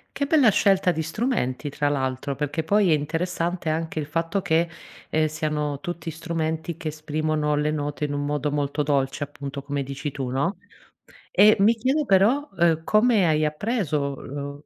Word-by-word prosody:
Che 280 - 0
bella 280 -5 +5
scelta 195 -2 +3
di 160 - -2
strumenti 160 - -1
tra 145 +1 -1
l'altro, 135 0 -1
perché 150 +3 -2
poi 200 +2 +3
è - - +5
interessante 170 +3 -1
anche 160 0 -2
il 150 - -2
fatto 165 +5 -1
che, 170 -1 +2 0.4
ehm, 155 0 +2
siano 150 -2 -2
tutti 170 +1 -5
strumenti 160 0 -3
che 160 - -4
esprimono 155 0 -1
le 150 +1 +1
note 145 0 -3
in 145 - -3
un 145 0 -2
modo 145 0 -1
molto 145 0 -1
dolce 140 -1 0
appunto. 140 -1 -6
come 140 0 -2
dici 140 +2 -5
tu, 135 -2 -4
no, 145 +9 -1 0.7
e 210 +1 +6
mi 215 +4 +5
chiedo 260 +7 +1
però, 240 +9 +3
uhm, 170 -3 +2
come 215 0 +4
hai 155 -1 +2
appreso, 150 - -1
lo 140 +1 -7
155 Hz, 170 wpm, -24 LUFS, 145-180 Hz, 0.7 s, e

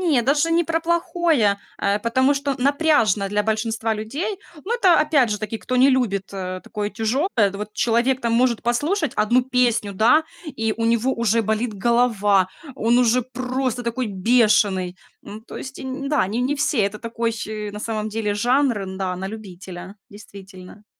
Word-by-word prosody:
Нет, 300 -10 +2
даже 290 +5 +2
не 340 +1 +3
про 325 +1 0
плохое, 330 - +1 0.2
э, 200 +1 +1
потому 260 +5 +2
что 280 0 -2
напряжно 265 - +2
для 210 +1 0
большинства 220 +1 -1
людей. 275 - -4 0.3
Ну, 465 - -1
это, 370 -9 +4
опять 300 -6 +3
же 210 - -1
таки, 215 +1 -4
кто 255 - -4
не 265 +2 +5
любит, 200 -7 0
э, 185 -1 -5
такое 210 0 -4
тяжёлое. 225 - 0
Да 200 - -8
вот 210 0 -6
человек 245 +3 +1
там 235 -1 -1
может 240 -1 +2
послушать 290 - 0
1 240 +4 +3
песню, 245 -5 +1
да, 235 +11 +4 0.2
и 225 -7 -2
у 230 - -2
него 235 +3 +2
уже 230 0 +1
болит 220 +2 -1
голова, 205 -3 +2 0.3
он 235 +2 +2
уже 250 +1 +3
просто 255 0 -3
такой 235 +1 -2
бешеный. 200 -3 +2 0.3
Ну, 215 +1 -9
то 225 - -11
есть, 270 0 -8
нь 265 +1 -5
да, 290 -10 +2
не 225 +5 -2
не 270 +3 0
все, 285 -2 0
это 200 +2 -2
такой, 230 0 -2 0.2
э, 210 -1 -5
на 210 - -7
самом 215 -1 -3
деле 210 -1 -2
жанр, 230 -5 0
да, 185 -1 -3
на 190 +1 -5
любителя, 190 -2 -9
действительно. 200 -1 -13
230 Hz, 175 wpm, -22 LUFS, 210-260 Hz, 0.3 s, не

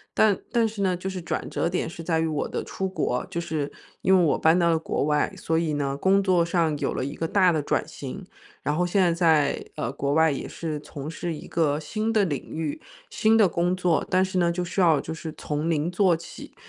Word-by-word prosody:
但 210 -3 +4
但 230 -1 +3
是 210 -2 -4
呢， 185 -2 +2
就 180 +2 -4
是 190 -1 -5
转 175 - -4
折 - - -1
点 175 -1 -1
是 165 0 -8
在 165 -1 +1
于 160 - +1
我 155 -2 -1
的 - - -3
出 190 - -3
国， 155 -9 -1
就 170 - -2
是 155 -4 -3 0.3
因 190 - +4
为 180 - +5
我 160 - +2
搬 160 +2 +4
到 170 -1 +3
了 165 - +3
国 160 - -1
外， 150 +5 +1
所 165 -3 -1
以 165 -2 0
呢， 140 -1 -1
工 195 +6 +3
作 185 -3 +3
上 165 -3 +1
有 - - -1
了 - - -2
一 140 +3 -4
个 165 - -2
大 185 0 +4
的 155 -3 0
转 - - 0
型。 - - -7 0.4
然 145 - -1
后 180 - +2
现 185 +3 +2
在 175 -2 +4
在， 160 -4 +2
呃， 120 - -2
国 140 0 -2
外 160 +1 +4
也 140 - -4
是 155 -3 -4
从 145 0 -7
事 165 +1 -4
一 150 - -9
个 150 -3 +1
新 215 +9 -2
的 215 -2 +4
领 145 -6 -3
域、 155 - -3 0.3
新 225 - +3
的 215 -3 +6
工 175 +2 0
作。 180 -3 +1
但 185 +1 +3
是 190 0 -2
呢， 170 -1 +3
就 180 +1 -2
是 175 +2 -4
要 165 -6 +4
就 160 - -6
是 160 -1 -7
从 150 +1 -3
0 160 0 +1
做 180 -1 +3
起， 165 +1 -10
170 Hz, 265 characters per minute, -25 LUFS, 155-185 Hz, 0.4 s, 的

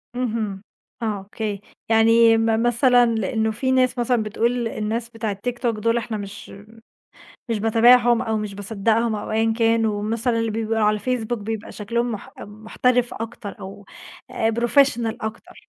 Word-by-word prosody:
اهم، 220 -5 -3 0.4
آه، 210 -4 -2
Okay 210 -3 -3 0.3
يعني 225 0 +5
م 225 0 +1
مثلًا 245 +1 +4
لأنه 220 +1 0
في 260 +4 -1
ناس 255 -1 +2
مثلًا 240 -2 +1
بتقول 235 +3 -1
الناس 225 +2 -3
بتاع 225 -3 -3
الTikTok 240 +4 -3
دول 230 +2 +1
إحنا 225 -1 -3
مش 200 0 -9 1.0
مش 225 -2 -1
باتابعهم 235 +2 +4
أو 220 -1 -1
مش 210 -2 -4
باصدقهم 220 +3 0
أو 210 - -5
أيًا 225 +1 +1
كان 225 0 +3
ومثلًا 225 +3 -1
اللي 225 0 -1
بيبقوا 225 +1 -2
على 210 0 +2
الFacebook 245 -1 -2
بيبقى 220 0 -6
شكلهم 235 +3 -2
مح 205 - -8
محترف 235 +4 -1
أكتر 225 -2 -7
أو 195 +1 -9 0.5
آآ 225 - 0
professional 235 0 +2
أكتر. 220 +2 -8
225 Hz, 150 wpm, -22 LUFS, 215-235 Hz, 1.0 s, يعني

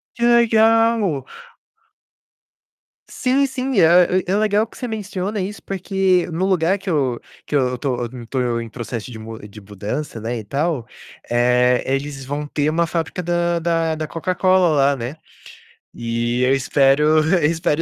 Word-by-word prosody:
Que 235 - -4
legal. 225 - +3 1.9
Sim 265 +2 +1
sim, 260 -4 -1
é 180 +2 +4
é 190 +2 0
legal 215 +1 +2
que - - -17
você 250 - -4
menciona 205 -2 -4
isso 200 +3 -5
porque 190 -1 0
no 175 +4 -1
lugar 185 0 +2
que 195 - -6
eu 135 -7 0 0.3
que - - -9
eu 125 -3 +1
estou 125 -1 -2
estou 120 0 -3
em 115 - -7
processo 120 0 -6
de 110 - -9 0.3
de 105 - -12
mudança, 105 +6 -6
não 115 - -4
é, 120 - -2
e - - -8
tal, 140 +2 -2 0.4
eh, 125 +1 +3
eles 135 +1 -3
vão 145 +2 -4
ter 150 +1 0
uma 170 +2 +1
fábrica 165 +2 -3
da 175 0 0
da 165 -1 0
da 155 0 -4
Coca-Cola 185 +2 +2
lá, 140 -2 +3
né, 125 +3 -5 0.8
e 120 +1 -2
eu 130 +1 +3
espero 135 +2 +3 0.3
eu 175 -5 +3
espero 160 0 0
160 Hz, 155 wpm, -20 LUFS, 125-190 Hz, 1.9 s, é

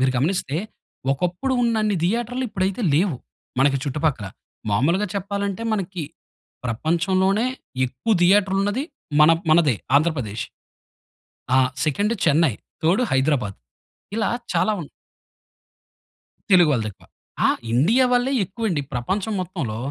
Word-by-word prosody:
మీరు 130 0 +2
గమనిస్తే 150 +1 0 0.6
ఒకప్పుడు 180 - -1
ఉన్నన్ని 215 -3 +1
థియేటర్లు 240 +6 -1
ఇప్పుడైతే 195 +1 -2
లేవు. 170 -2 +2 0.4
మనకి 135 +1 +4
చుట్టుపక్కల 145 -6 -1 0.4
మామూలుగా 165 - +2
చెప్పాలంటే 200 +1 -3
మనకి 190 -4 -3 0.6
ప్రపంచంలోనే 185 - +1 0.4
ఎక్కువ 130 - -2
థియేటర్లున్నది 200 +5 +3 0.4
మన 150 +1 +8 0.2
మనదే 155 -6 +5 0.2
ఆంధ్రప్రదేశ్. 135 -9 0 1.1
ఆ! - - +6 0.3
Second 205 +9 +1
Chennai, 155 -4 +3 0.3
third 180 +9 +3
Hyderabad. 130 -7 +1 0.6
ఇలా 225 - +1 0.2
చాలా 215 - +2
ఉన్ 150 - -8 1.6
తెలుగు 175 -4 +6
వాళ్ళదెక్కువ. 110 -6 -3 0.4
ఆ! - - +4 0.2
ఇండియావాళ్ళే 245 - +3
ఎక్కువండి 195 -4 -2
ప్రపంచం 190 - -2
మొత్తంలో. 165 - -4
175 Hz, 100 wpm, -22 LUFS, 140-205 Hz, 1.6 s, మన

